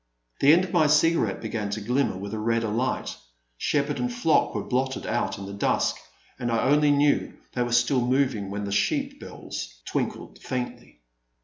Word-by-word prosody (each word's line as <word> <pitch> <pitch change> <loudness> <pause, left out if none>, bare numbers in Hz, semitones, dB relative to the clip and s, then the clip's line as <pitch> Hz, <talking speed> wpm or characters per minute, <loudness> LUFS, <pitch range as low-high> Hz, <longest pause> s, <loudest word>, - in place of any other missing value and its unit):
The 140 - +6
end 170 +4 +5
of 180 - -9
my 160 -4 +4
cigarette 150 -8 +3
began 110 -2 -3
to 105 +2 -3
glimmer 125 0 0
with 100 +2 -6
a 110 - -3
redder 115 0 0
light; 120 +5 -1 0.4
shepherd 145 - 0
and 245 - -1
flock 240 -10 +2
were - - -1
blotted 130 +1 -1
out 120 +2 -1
in 100 - -7
the 100 - -7
dusk, 100 - +1 0.4
and 120 -1 -1
I 115 - +1
only 150 +1 +4
knew 145 0 +2 0.2
they 125 - -1
were 120 0 -1
still 120 +2 +3
moving 125 -5 +1
when 100 +1 -4
the 100 - -4
sheep 100 - 0
bells - - -8
tinkled - - -3
faintly. 125 - -5
125 Hz, 185 wpm, -26 LUFS, 105-145 Hz, 0.4 s, The